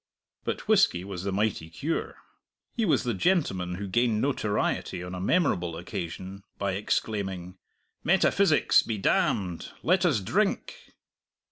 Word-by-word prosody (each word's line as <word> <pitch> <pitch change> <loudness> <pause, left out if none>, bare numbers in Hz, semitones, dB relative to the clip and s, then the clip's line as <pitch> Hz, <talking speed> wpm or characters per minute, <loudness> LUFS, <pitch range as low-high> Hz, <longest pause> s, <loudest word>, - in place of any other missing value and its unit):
But - - -3
whisky 195 - +4
was 95 -1 -6
the 100 - -1
mighty 95 -5 -1
cure. 145 - -3 0.6
He 230 -4 +1
was 165 - +2
the 120 -2 -1
gentleman 95 - +1
who 100 +2 -5
gained 115 +2 +2
notoriety 105 -8 -1
on 90 0 -7
a 90 - -5
memorable 90 - +1
occasion 95 +3 -6
by 100 -1 -1
exclaiming, 95 -2 -2 0.4
"Metaphysics 190 -1 +4
be 110 - -3
damned; 95 -2 0
let 185 +2 +3
us 155 -11 +3
drink!" 215 - -1
100 Hz, 130 wpm, -27 LUFS, -, 0.6 s, whisky